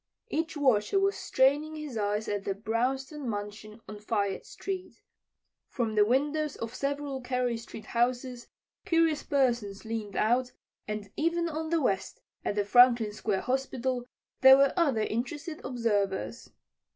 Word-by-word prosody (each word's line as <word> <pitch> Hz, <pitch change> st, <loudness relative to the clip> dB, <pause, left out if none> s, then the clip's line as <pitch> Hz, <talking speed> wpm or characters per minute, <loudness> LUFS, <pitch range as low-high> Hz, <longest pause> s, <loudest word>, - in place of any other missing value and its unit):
Each 320 Hz, 0 st, -2 dB
watcher 260 Hz, -, +3 dB
was 395 Hz, +1 st, +2 dB
straining 290 Hz, +4 st, +2 dB
his 305 Hz, -5 st, -6 dB
eyes 210 Hz, 0 st, -1 dB
at 205 Hz, -1 st, -2 dB
the 195 Hz, -, -2 dB
brownstone 255 Hz, +6 st, -2 dB
mansion 210 Hz, +1 st, -6 dB
on 210 Hz, -1 st, -8 dB
Fayette 200 Hz, -2 st, -2 dB
street. 380 Hz, -2 st, -5 dB, 0.7 s
From 230 Hz, -4 st, -2 dB
the 210 Hz, -1 st, +5 dB
windows 290 Hz, +6 st, +1 dB
of 230 Hz, +1 st, -6 dB
several 280 Hz, 0 st, -3 dB
Carey 250 Hz, -1 st, -1 dB
street 225 Hz, -1 st, -9 dB
houses 245 Hz, +1 st, -1 dB, 0.4 s
curious 330 Hz, -2 st, +2 dB
persons 235 Hz, -8 st, 0 dB
leaned 220 Hz, -3 st, -4 dB
out, 245 Hz, +3 st, +1 dB, 0.3 s
and 210 Hz, -1 st, -5 dB
even 335 Hz, +2 st, 0 dB
on 315 Hz, 0 st, -3 dB
the 335 Hz, 0 st, +2 dB
west, 195 Hz, -6 st, -1 dB, 0.2 s
at -, -, -1 dB
the 205 Hz, -1 st, +1 dB
Franklin 240 Hz, 0 st, +6 dB
Square 205 Hz, -2 st, -1 dB
Hospital, 260 Hz, -1 st, -1 dB, 0.4 s
there 265 Hz, 0 st, +9 dB
were 275 Hz, 0 st, +4 dB
other 285 Hz, -11 st, +2 dB
interested 295 Hz, +9 st, -3 dB
observers. 225 Hz, -4 st, -1 dB
250 Hz, 140 wpm, -29 LUFS, 215-285 Hz, 0.7 s, there